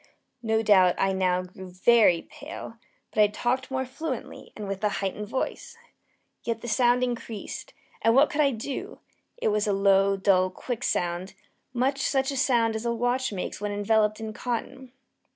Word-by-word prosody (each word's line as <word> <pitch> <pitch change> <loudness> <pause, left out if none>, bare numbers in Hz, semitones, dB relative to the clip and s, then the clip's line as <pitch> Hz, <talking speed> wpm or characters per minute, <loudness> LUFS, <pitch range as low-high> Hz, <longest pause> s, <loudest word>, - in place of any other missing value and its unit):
No 220 -1 +1
doubt 185 -4 +5
I 195 0 +1
now 185 -1 +1
grew 185 0 -11
very 185 -1 +4
pale; 285 -6 -9 0.3
but 215 - +2
I 210 - +7
talked 245 +5 -1
more 260 0 -1
fluently, 260 0 -6
and 210 -2 -6
with 195 +1 -5
a 210 - +3
heightened 200 +2 -3
voice. 460 - -4 0.7
Yet 230 -1 -2
the - - -6
sound 245 +1 +3
increased 240 - -5 0.3
and 225 +1 +4
what 280 +3 +5
could 300 - +1
I 285 - +4
do? 260 +2 -5 0.4
It - - 0
was 210 0 +1
a 205 - +2
low, 195 0 +3
dull, 190 -1 +3
quick 245 +5 -5
sound 175 +2 -1 0.4
much 260 +3 0
such 270 0 +1
a - - -4
sound 235 -5 +2
as 220 - -3
a 235 - 0
watch 245 +2 0
makes 195 0 -5
when 210 0 -2
enveloped 210 +1 +1
in 220 -1 -5
cotton. 245 +3 -5
225 Hz, 175 wpm, -26 LUFS, 195-255 Hz, 0.7 s, I